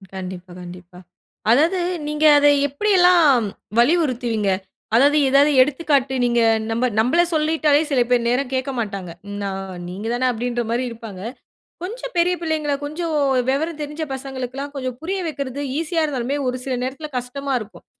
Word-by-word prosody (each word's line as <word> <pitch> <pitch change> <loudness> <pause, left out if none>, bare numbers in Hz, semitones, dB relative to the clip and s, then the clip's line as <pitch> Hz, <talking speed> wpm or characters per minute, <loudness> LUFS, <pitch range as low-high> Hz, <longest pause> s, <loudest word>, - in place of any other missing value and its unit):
கண்டிப்பா, 185 -1 -7
கண்டிப்பா. 180 0 -11 0.5
அதாவது 320 +9 +3 0.3
நீங்க 300 +1 0
அத 290 0 +5 0.2
எப்படி 285 +10 -2
எல்லாம் 330 -10 +5 0.3
வலியுறுத்துவீங்க? 240 - +2 0.5
அதாவது, 285 +5 +5
ஏதாவது 280 +2 +5
எடுத்துக்காட்டு 280 -1 +1
நீங்க 240 0 +2 0.3
நம்ப 235 +3 0
நம்பள 255 +10 +3
சொல்லிட்டாலே 310 -1 +2
சில 260 -3 +3
பேர் 245 -1 +2
நேரம் 255 +2 0
கேட்க 260 +1 -1
மாட்டாங்க. 195 -5 -4 0.3
நா 200 - -2 0.4
நீங்க 195 +5 -6
தான 255 +1 +1
அப்படீன்ற 240 +1 -2
மாதிரி 240 +2 0
இருப்பாங்க. 225 -5 -9 0.6
கொஞ்சம் 480 +6 -6
பெரிய 355 +1 +3
பிள்ளைங்கள, 310 -3 -1
கொஞ்சம் 320 +3 -3 0.4
வெவரம் 310 +4 -1
தெரிஞ்ச 300 +2 -4
பசங்களுக்கெல்லாம் 265 +1 -5
கொஞ்சம் 255 -2 -4
புரிய 380 +4 -2
வைக்கிறது 280 -3 -4 0.2
ஈஸியா 330 0 -1
இருந்தாலுமே, 275 -1 -2
ஒரு 250 0 -1
சில 260 -2 -1
நேரத்துல 275 +4 -5
கஷ்டமா 275 +3 -4
இருக்கும். 215 0 -12
270 Hz, 145 wpm, -21 LUFS, 240-305 Hz, 0.6 s, அத